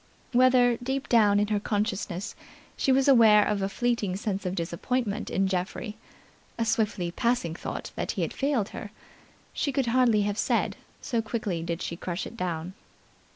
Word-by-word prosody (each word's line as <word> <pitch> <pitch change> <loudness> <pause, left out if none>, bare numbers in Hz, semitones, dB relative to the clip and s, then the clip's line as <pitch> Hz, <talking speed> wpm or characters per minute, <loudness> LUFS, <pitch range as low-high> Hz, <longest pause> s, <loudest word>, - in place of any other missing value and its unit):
Whether, 250 -1 +5
deep 265 +2 -2
down 210 -4 +5
in 205 0 +1
her 210 -1 +1
consciousness, 205 -2 -2 0.4
she 270 - +1
was 265 +1 +3
aware 220 -6 +7
of 205 -1 0
a 195 - 0
fleeting 230 -4 0
sense 195 -2 -3
of 180 - -2
disappointment 205 +6 -2
in 195 - +1
Geoffrey, 190 +4 -3 0.6
a 230 - 0
swiftly 215 -6 0
passing 235 -5 0
thought - - -6
that - - -2
he - - -1
had - - -3
failed 270 -7 0
her, 210 - -7 0.6
she 285 - -1
could 270 -1 0
hardly 235 -3 +3
have 205 +1 -2
said, - - +1 0.3
so 235 -4 -1
quickly 215 -6 -3
did 170 0 -3
she 170 - -3
crush 175 +1 -4
it - - -9
down. 175 -3 -3
210 Hz, 170 wpm, -27 LUFS, 190-240 Hz, 0.6 s, aware